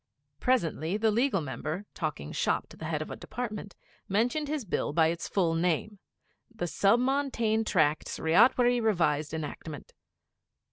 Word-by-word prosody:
Presently, 175 - +1
the 220 0 +2
Legal 230 -3 +2
Member, 155 +6 -4
talking 150 - -4
'shop' - - 0
to - - -13
the 160 - -8
Head 155 -1 -1
of - - -10
a - - -4
Department, 215 -5 -6 0.3
mentioned 240 +9 +1
his 295 -4 -2
Bill 160 -5 -1
by 160 0 +4
its 170 0 -3
full 175 -5 +1
name 180 +5 0 0.5
'The 225 -6 -4
Sub 200 +6 +3
Montane 250 -4 +1
Tracts 155 -7 +1
Ryotwary 240 +8 +4
Revised 160 -9 +1
Enactment.' 155 -1 -6
195 Hz, 145 wpm, -29 LUFS, 160-235 Hz, 0.5 s, by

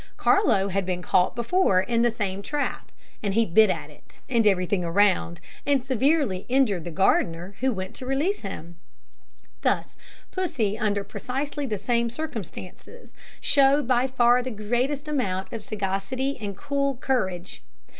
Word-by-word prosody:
Carlo 390 - +3
had 195 +1 0
been 180 -1 -3
caught 180 0 +2
before 235 - +2
in 230 +5 +1
the 240 - +4
same 200 -4 -3
trap, 290 +7 -3 0.3
and 200 -2 -1
he 230 0 +4
bit 215 +3 +5
at 155 -4 -3
it, 145 - -20
and 230 -4 +2
at - - +9
everything 185 -1 0
around, 175 -1 +2 0.2
and 280 -3 +2
severely 265 - +1
injured 240 -10 +2
the - - -4
gardener, 175 0 +1
who 260 +1 +2
went 190 -4 -5
to 255 - -8
release 300 +10 0
him. 175 -4 -7 0.8
Thus - - 0 0.4
Pussy, 235 - -1
under 205 -3 0
precisely 280 +6 -4
the 215 -3 -2
same 235 +3 0
circumstances, 245 - -8 0.3
showed 280 -1 +4
by 255 0 +3
far 245 -1 +4
the 255 - -4
greatest 245 +7 -1
amount 195 -11 -2
of 225 - -4
sagacity 210 +7 -2
and 200 -2 -5
cool 280 -1 -1
courage. 190 -9 -2
225 Hz, 155 wpm, -25 LUFS, 190-270 Hz, 0.8 s, at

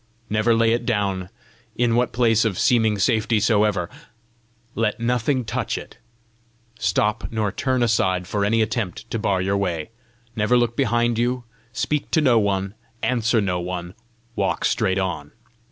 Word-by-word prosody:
Never 110 +2 +3
lay 115 0 +3
it 120 - -1
down, 100 -5 -1 0.5
in 120 -1 +1
what 120 0 +1
place 115 -2 +3
of 105 -5 -1
seeming 110 -3 +3
safety 110 +1 +2
soever; 105 -4 +2 0.9
let 110 -1 -1
nothing 125 +2 0
touch - - -2
it; - - -10 0.8
stop 105 +1 0
nor 110 -3 -1
turn 130 +2 0
aside 95 -5 +1
for 100 +2 -1
any 110 +2 +3
attempt 110 -4 -3
to 115 - -1
bar 95 -3 0
your 100 +1 0
way; 90 -2 -2 0.4
never 110 +3 +2
look 120 -1 +1
behind 120 -2 +1
you; 125 +1 0 0.3
speak 130 +5 -2
to - - +2
no 125 -6 +4
one, 100 -1 -1 0.3
answer 120 -2 +2
no 90 -4 0
one, 90 0 -5 0.4
walk - - 0
straight 95 0 +1
on. 90 -6 -3
110 Hz, 155 wpm, -22 LUFS, 100-120 Hz, 0.9 s, no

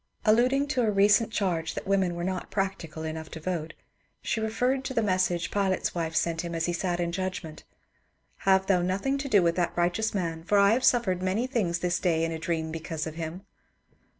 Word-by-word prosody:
Alluding 250 +6 +4
to 260 -4 +1
a 225 - +2
recent 210 +2 +4
charge 175 -7 -1
that - - -5
women 190 -3 +1
were 170 - -4
not 185 0 -3
practical 190 -5 -3
enough 160 0 -5
to 160 - -8
vote, 165 -1 -4 0.5
she - - -1
referred 250 +5 0
to 260 - -4
the 230 - +2
message 185 -3 0
Pilate's 195 -2 0
wife 165 -2 -3
sent 165 0 +1
to 170 - -2
him 170 - -5
as 165 -1 0
he 175 - -1
sat 175 0 -1
in 170 -1 -1
judgment, 185 -3 -4
^' - - -38 0.6
Have 190 0 +3
thou 190 -2 +3
nothing 195 +10 0
to 275 0 -4
do 205 -6 +5
with 170 0 +2
that 175 -1 -1
righteous 180 +6 +1
man; 165 -4 -2
for 205 +4 +2
I 200 0 +6
have 250 +3 +1
suffered 195 -7 +3
many 190 +6 0
things 210 -10 0
this 175 0 -1
day 165 -2 +1
in 165 - -3
a 160 - -4
dream 160 -1 -2
because 160 -1 -4
of 160 - -5
him." 165 +4 -6
185 Hz, 220 wpm, -27 LUFS, 165-210 Hz, 0.6 s, I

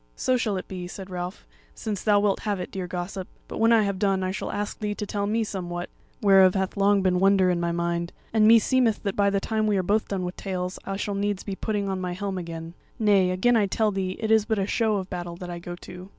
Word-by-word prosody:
"So 255 - +1
shall 220 -5 0
it 185 - -6
be," 180 -2 -6
said 190 +1 -9
Ralph, 180 - -5 0.3
"since 210 -3 -4
thou 205 -2 +4
wilt 200 -1 +1
have 205 -3 -2
it, 180 - -5
dear 190 -2 -4
gossip; 180 +1 -5 0.2
but - - -6
when 225 +1 +4
I 225 -2 +5
have 200 -2 -2
done 195 -2 +1
I 185 - -1
shall 195 - -4
ask 205 0 -4
thee 210 -1 -2
to 210 - -4
tell 200 0 -2
me 225 +2 +1
somewhat, 175 -4 -5 0.3
whereof 195 -2 +6
hath 190 -1 -1
long 200 -1 +3
been 180 -1 +2
wonder 190 -1 +4
in 175 - 0
my 170 0 0
mind; 170 0 -1 0.2
and 215 -1 +5
meseemeth 230 0 +4
that 200 -2 -2
by 200 -1 +3
the 200 0 +1
time 215 +1 -1
we 205 -2 +2
are 185 - +1
both 210 +4 +1
done 195 -2 -2
with 180 - -5
tales, 180 -1 -4
I 195 - -3
shall 205 0 -2
needs 200 -1 -1
be 200 - -4
putting 205 0 -2
on 190 -1 -2
my 180 -1 -2
helm 195 0 -3
again. 165 -1 -7 0.2
Nay, 200 -4 +4
again 190 +7 +3
I 210 -3 +3
tell 215 +2 +1
thee 190 -1 -2
it 220 0 -1
is 220 -1 +5
but 220 -1 0
a 195 - +1
show 220 +1 +1
of 190 -2 -2
battle 175 -2 -5
that 175 0 -7
I 175 - -5
go 175 0 -7
to!" 180 +1 -11
195 Hz, 265 wpm, -25 LUFS, 180-210 Hz, 0.3 s, whereof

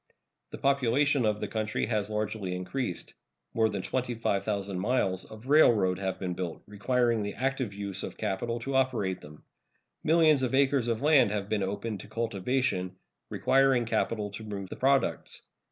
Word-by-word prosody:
The - - -8
population 140 -1 +2
of 105 -1 0
the - - -2
country 110 -1 -2
has 105 -3 -1
largely 105 -3 -2
increased. 90 +2 -4 0.4
More 110 -1 +3
than 100 -3 -4
25,000 100 -6 -2
miles 95 -4 0
of 110 +2 -12
railroad 110 - +4
have 95 -1 -2
been 90 -2 -3
built, 90 -2 -5
requiring 115 +2 +1
the 100 -1 -4
active 130 -4 -1
use 100 -2 -3
of - - -6
capital 115 +5 -2
to 135 +3 -4
operate 120 -9 0
them. 75 0 -13 0.6
Millions 155 -3 +4
of 130 0 0
acres 135 -2 +3
of 115 +2 -1
land 145 -7 +5
have 100 -1 -3
been 105 -1 0
opened 100 +2 -3
to - - -10
cultivation, 115 -3 -1 0.3
requiring 135 -2 +3
capital 110 -2 -1
to 105 +2 -8
move 100 -3 -6
the - - -6
products. 135 +1 0
110 Hz, 160 wpm, -29 LUFS, 100-130 Hz, 0.6 s, land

